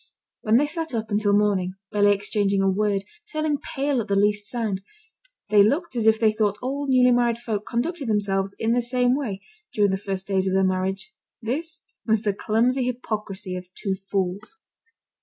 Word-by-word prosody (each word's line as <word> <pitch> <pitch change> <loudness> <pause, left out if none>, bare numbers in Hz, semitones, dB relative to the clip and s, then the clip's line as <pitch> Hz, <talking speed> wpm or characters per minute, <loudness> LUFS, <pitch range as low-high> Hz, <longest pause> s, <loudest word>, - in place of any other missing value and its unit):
When 220 +1 +3
they 290 - +3
sat 320 -3 -4
up 220 -1 -3
until 205 -1 +3
morning, 195 -3 +1 0.2
barely 205 0 +4
exchanging 200 -1 +1
a - - +3
word, 200 0 +1 0.3
turning 310 -2 0
pale 275 -3 -1
at 220 - -7
the 200 - +1
least 205 +1 +2
sound, 220 -6 -2 0.7
they 210 -1 +6
looked 275 - +1
as 225 -2 +1
if 220 0 +5
they 220 -2 +4
thought 210 -2 0
all 280 +3 -3
newly 250 -1 +5
married 240 -1 +2
folk 220 -3 -4
conducted 280 +4 -2
themselves 200 -2 0
in 225 0 0
the 245 +1 +3
same 250 +1 +2
way, 215 -9 -3 0.3
during 205 -4 +2
the 190 - 0
first 195 -1 -3
days 190 -1 0
of 190 - +1
their 190 - +3
marriage. 190 - -1 0.3
This 310 +8 -4 0.2
was 220 -1 +1
the 205 -3 +1
clumsy 240 +6 +1
hypocrisy 210 -6 -4
of 180 0 -8
two 195 - -2
fools. 195 - -3
215 Hz, 185 wpm, -24 LUFS, 195-245 Hz, 0.7 s, they